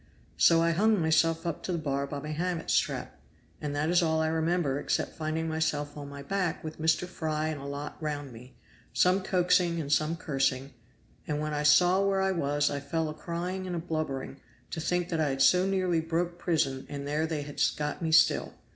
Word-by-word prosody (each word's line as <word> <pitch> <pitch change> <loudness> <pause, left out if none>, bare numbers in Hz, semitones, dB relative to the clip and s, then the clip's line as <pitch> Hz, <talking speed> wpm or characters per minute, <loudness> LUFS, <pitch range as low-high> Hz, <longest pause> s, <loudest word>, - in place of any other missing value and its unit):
So 165 -1 +5
I 170 - +3
hung 210 +5 +3
myself 165 +1 +2
up 170 -3 -3
to - - -4
the 175 - 0
bar 140 -3 -2
by 145 - -5
my 150 +2 -5
hammock 170 +2 -2
strap, - - -1 0.4
and 145 -1 -3
that 145 +2 0
is 175 - +4
all 160 -1 +1
I 160 0 +1
remember 160 -3 0
except - - -1
finding 160 +1 -2
myself 150 -2 -1
on 145 -1 -7
my 140 0 -8
back, 185 +1 -2
with 155 0 -7
Mr. 160 +2 +2
Fry 155 -3 -2
and 150 -3 -4
a - - -8
lot 140 +2 -6
round 145 -4 -4
me, 125 +3 -14 0.4
some 185 +2 +3
coaxing 180 -2 +2
and 145 -2 -1
some 155 +2 +1
cursing; 135 -3 -1 0.5
and 150 -1 -1
when 155 0 -2
I 150 - -1
saw 180 +6 +5
where 195 -1 +1
I 190 - +2
was 145 -4 +1
I 145 - -2
fell 160 +3 -2
a - - -5
crying 180 +4 -4
and 175 -1 -4
blubbering, 145 -5 -3 0.3
to 160 - -3
think 180 +2 -1
that 165 - -1
I 150 - +2
had 135 0 -2
so 180 +4 +5
nearly 185 -4 +1
broke 170 +2 -2
prison 140 -6 0
and 140 -1 -5
there 150 +2 0
they 155 -2 -3
had 145 0 -6 0.2
got 150 +2 -3
me 160 -1 -1
still. 160 -1 +4
160 Hz, 210 wpm, -29 LUFS, 145-170 Hz, 0.5 s, So